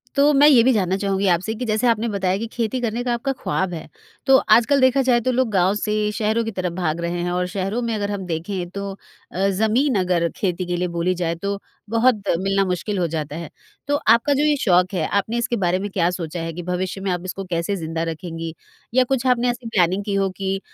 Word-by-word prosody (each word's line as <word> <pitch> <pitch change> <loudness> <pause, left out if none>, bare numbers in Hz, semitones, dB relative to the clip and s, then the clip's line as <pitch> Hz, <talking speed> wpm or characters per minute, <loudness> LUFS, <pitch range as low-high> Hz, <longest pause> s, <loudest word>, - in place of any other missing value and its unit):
तो 285 +1 +5
मैं 285 +1 +6
ये 270 -6 +7
भी 260 - +4
जानना 190 -4 +1
चाहूँगी 195 0 0
आपसे, 180 +5 +1
कि 250 +3 -4
जैसे 220 +2 +1
आपने 230 0 +2
बताया 190 -2 0
कि 225 - -3
खेती 230 +1 -2
करने 235 0 -2
का 245 -1 0
आपका 240 +4 -1
ख्वाब 190 -1 -1
है। 165 - -7 0.4
तो 270 -1 +7
आजकल 240 +5 +4
देखा 260 +1 +4
जाए 240 -2 +5
तो 255 - 0
लोग 255 -1 +1
गाँव 190 -1 +3
से 210 0 -1
शहरों 220 +2 0
की 225 - -3
तरफ 185 -3 -3
भाग 170 -2 -2
रहें 170 +1 -2
हैं 175 - -1
और 180 0 0
शहरों 195 +4 -2
में 235 -1 -2
अगर 205 -1 -2
हम 195 -2 -4
देखें 175 +2 -3
तो 200 +1 -5 0.4
अ, 190 +3 +1
ज़मीन 220 +7 +1
अगर 180 -2 +1
खेती 185 -2 -2
के 175 0 -2
लिए 180 +1 0
बोली 170 +1 0
जाए 165 0 -1
तो 200 +4 -3 0.3
बहुत 230 0 +3 0.2
मिलना 195 +1 +1
मुश्किल 185 +3 -2
हो 175 - +1
जाता 150 -2 -4
है, 165 -1 -6 0.4
तो 290 - +2
आपका 235 +1 +3
जो 280 +1 +1
ये 300 -1 +3
शौक 180 -2 +3
है, 170 -4 0
आपने 205 +4 -1
इसके 235 0 0
बारे 185 -2 +1
में 205 +2 -4
क्या 175 -3 +1
सोचा 175 -1 -5
है? 165 0 -4
कि 175 +2 -6
भविष्य 180 +2 -3
में 195 -1 -1
आप 175 -1 -2
इसको 190 +1 -5
कैसे 170 +3 -1
ज़िंदा 165 -2 -3
रखेंगी? 165 0 -5 0.4
या 255 +1 +5
कुछ 265 -1 +1
आपने 250 -1 +3
ऐसी 245 0 -4
प्लानिंग 190 -2 +1
की 205 - -2
हो 195 -1 +1
कि 195 0 -2
195 Hz, 240 wpm, -21 LUFS, 180-230 Hz, 0.4 s, ये